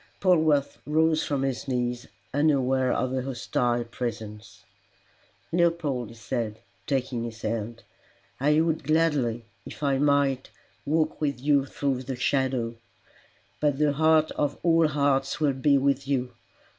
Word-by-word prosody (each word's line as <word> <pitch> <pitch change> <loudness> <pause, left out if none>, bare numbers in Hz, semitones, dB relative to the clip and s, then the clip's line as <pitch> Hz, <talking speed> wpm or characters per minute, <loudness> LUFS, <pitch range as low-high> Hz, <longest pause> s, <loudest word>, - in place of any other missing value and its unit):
Polwarth 155 -6 +2
rose 160 +1 +2
from 140 -2 -1
his 135 -1 -2
knees 125 -1 -2 0.3
unaware 135 -3 +2
of 130 0 -1
a 130 - 0
hostile 120 -2 -1
presence. 110 -4 -7 0.9
"Leopold," 165 -8 0
he 115 - -12
said, 110 -1 -3 0.3
taking 130 -4 -1
his 115 -1 -7
hand, 115 +1 -3 0.6
"I 150 +3 +3
would 160 -1 0
gladly, 140 -7 +1 0.2
if - - -10
I 135 -2 +2
might, 140 -2 +2 0.4
walk 155 +1 0
with 140 -4 -1
you 140 0 +2
through 135 -2 -2
the 130 0 -5
shadow. 125 -3 0 0.8
But 145 -2 +1
the 150 -1 +2
heart 155 +1 +3
of 145 -1 -1
all 165 -1 +4
hearts 140 -1 0
will 145 -3 +2
be 140 +2 +3
with 140 0 +1
you. 125 -3 -1
135 Hz, 135 wpm, -26 LUFS, 125-150 Hz, 0.9 s, all